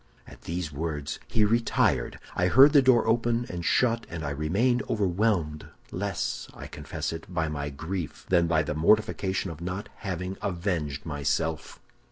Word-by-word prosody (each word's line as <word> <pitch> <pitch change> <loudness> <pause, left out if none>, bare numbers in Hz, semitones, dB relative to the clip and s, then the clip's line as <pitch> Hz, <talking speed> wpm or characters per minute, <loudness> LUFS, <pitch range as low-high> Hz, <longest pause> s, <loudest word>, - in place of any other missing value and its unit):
"At - - -14
these 85 -1 -3
words 75 -1 -4
he 110 -2 +3
retired. 115 +2 +1 0.2
I 90 - +2
heard 135 - +7
the 145 - +8
door 130 -4 +4
open 115 +1 +1
and 85 -1 -5
shut, 115 +4 +2
and 85 -2 -5
I 70 - -2
remained 100 - +1
overwhelmed, 95 -6 0 0.2
less, 100 -1 -3
I - - -8
confess - - -5
it, 80 +2 -8
by 80 -3 0
my 75 -1 -3
grief 80 +4 -5
than 85 -2 +3
by 80 -1 +2
the 75 - -3
mortification 95 +2 +2
of 80 0 -10
not 90 +3 -4
having 90 0 -4
avenged 85 -7 -2
myself. 75 +1 -2
90 Hz, 160 wpm, -27 LUFS, 80-105 Hz, 0.2 s, the